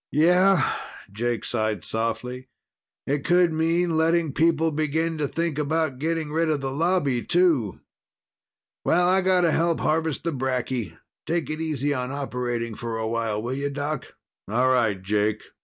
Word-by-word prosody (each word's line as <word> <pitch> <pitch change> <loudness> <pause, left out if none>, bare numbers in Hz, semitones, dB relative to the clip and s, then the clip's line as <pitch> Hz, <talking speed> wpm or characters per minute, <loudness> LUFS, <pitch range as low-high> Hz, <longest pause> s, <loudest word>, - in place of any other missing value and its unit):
"Yeah." 180 +5 +4 0.4
Jake 115 +2 -2
sighed 110 -1 -1
softly. 125 +3 -3 0.6
"It 140 0 -1
could 175 -1 +3
mean 165 +2 +1
letting 160 -1 +2
people 160 0 +2
begin 155 +2 -1
to 145 - +1
think 165 0 -2
about 155 -2 0
getting 160 0 -1
rid 165 +1 +1
of 150 -2 +1
the 135 -1 -3
Lobby, 145 -4 +1
too. 165 - +2 1.0
Well, 175 +2 +3
I 190 +1 +4
gotta 180 -3 +3
help 170 +1 +1
harvest 160 -1 0
the 170 - -1
bracky. 130 -3 -2 0.3
Take 165 -1 -1
it 155 +1 -4
easy 145 -3 -1
on 125 -1 -3
operating 125 -4 -3
for 115 +1 -4
a 110 0 -2
while, 110 -2 -1
will 120 +2 -2
you, 140 +1 -2
Doc?" 145 0 -4 0.3
"All 125 +5 +2
right, 115 -6 +2
Jake. 105 +2 0
145 Hz, 155 wpm, -25 LUFS, 125-165 Hz, 1.0 s, Yeah